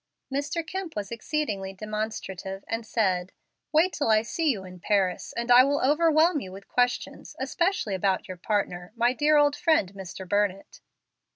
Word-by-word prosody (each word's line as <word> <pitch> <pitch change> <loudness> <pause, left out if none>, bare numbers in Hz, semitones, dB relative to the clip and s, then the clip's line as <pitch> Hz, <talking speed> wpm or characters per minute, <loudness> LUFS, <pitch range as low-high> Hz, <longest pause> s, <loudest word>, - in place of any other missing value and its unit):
Mr. 290 +4 -2
Kemp 375 0 -5
was 205 0 -4
exceedingly 225 -6 -3
demonstrative, 200 -2 -5
and 225 0 -3
said, 185 -5 0 0.4
"Wait 330 +4 +3
till 285 - -1
I 215 0 +4
see 320 +7 -1
you 210 -8 -1
in 180 0 -11
Paris, 190 -1 0
and 235 +1 -1
I 245 +1 +9
will 285 +2 +1
overwhelm 315 +3 +3
you 190 -7 -8
with 195 +1 -11
questions, 245 0 -1
especially 345 - 0
about 190 0 0
your 185 - -7
partner, 180 -1 -2
my 240 +1 +2
dear 300 +3 +3
old 290 0 +4
friend, 315 - +2
Mr. 190 -1 -8
Burnett." 200 0 -1
220 Hz, 165 wpm, -26 LUFS, 195-295 Hz, 0.4 s, I